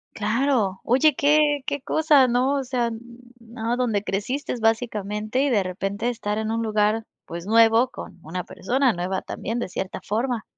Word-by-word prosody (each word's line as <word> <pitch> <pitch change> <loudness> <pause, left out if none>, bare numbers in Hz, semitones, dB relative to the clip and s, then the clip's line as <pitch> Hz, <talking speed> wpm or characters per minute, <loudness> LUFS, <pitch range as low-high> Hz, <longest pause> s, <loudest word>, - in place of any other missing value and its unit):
Claro, 215 -3 0
oye, 265 +4 +3
qué 290 -1 +3
qué 285 -1 -2
cosa, 295 -3 +4
¿no?, 255 +4 +2
o 275 - -1
sea, 245 -2 0
n 225 -1 -5 0.4
no, 230 +1 -4
donde 225 -5 0
creciste 210 +10 -3
básicamente, 220 0 -1
y 285 - +2
de 205 -6 +2
repente 195 +5 -3
estar 210 -3 -3
en 220 0 -2
un 230 - -1
lugar, 215 0 +1 0.2
pues, 170 +1 -7
nuevo 230 +3 +5
con - - -10
una 175 +3 -5
persona 255 +7 0
nueva 185 +1 -3
también 230 +4 -4
de 215 - -3
cierta 185 +1 -5
forma. 230 +2 -1
230 Hz, 170 wpm, -23 LUFS, 210-260 Hz, 0.4 s, nuevo